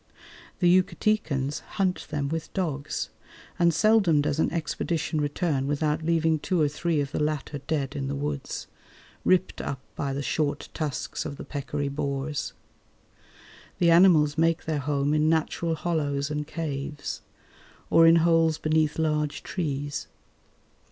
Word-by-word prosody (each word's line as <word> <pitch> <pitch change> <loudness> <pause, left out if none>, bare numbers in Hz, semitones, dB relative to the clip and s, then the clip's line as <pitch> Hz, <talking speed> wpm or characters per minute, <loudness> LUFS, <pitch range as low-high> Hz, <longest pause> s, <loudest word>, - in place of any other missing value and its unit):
The 175 - +2
Yucatecans 170 -7 -1 0.2
hunt 185 -2 0
them 145 -2 -1
with 160 +2 -4
dogs, 155 -7 -2 0.5
and 170 -1 +5
seldom 195 -3 +4
does 145 +1 0
an - - +2
expedition 160 -1 -1
return 145 -2 0
without 150 +1 0
leaving 160 -1 +2
two 180 +3 0
or 150 - +4
three 155 +2 -1
of 140 0 -4
the - - -2
latter 150 -1 -2
dead 140 -2 -2
in 135 -1 -2
the 140 - -2
woods, 145 0 -4 0.6
ripped 185 0 +2
up 135 - -4 0.2
by 140 -2 -2
the 140 +1 -3
short 145 0 -1
tusks 150 -4 -3
of 140 - -6
the - - -8
peccary 145 0 -3
boars. 140 0 -3 1.2
The 170 -1 +4
animals 165 -4 +5
make 165 0 +2
their 155 -2 -1
home 140 +1 0
in 155 0 +3
natural 165 +1 0
hollows 150 -3 -1
and 150 0 -3
caves, 150 -3 -4 0.7
or 165 0 +7
in 165 - +7
holes 165 -2 +4
beneath 155 -1 +1
large 150 -2 0
trees. 145 -5 -3
150 Hz, 145 wpm, -26 LUFS, 145-165 Hz, 1.2 s, or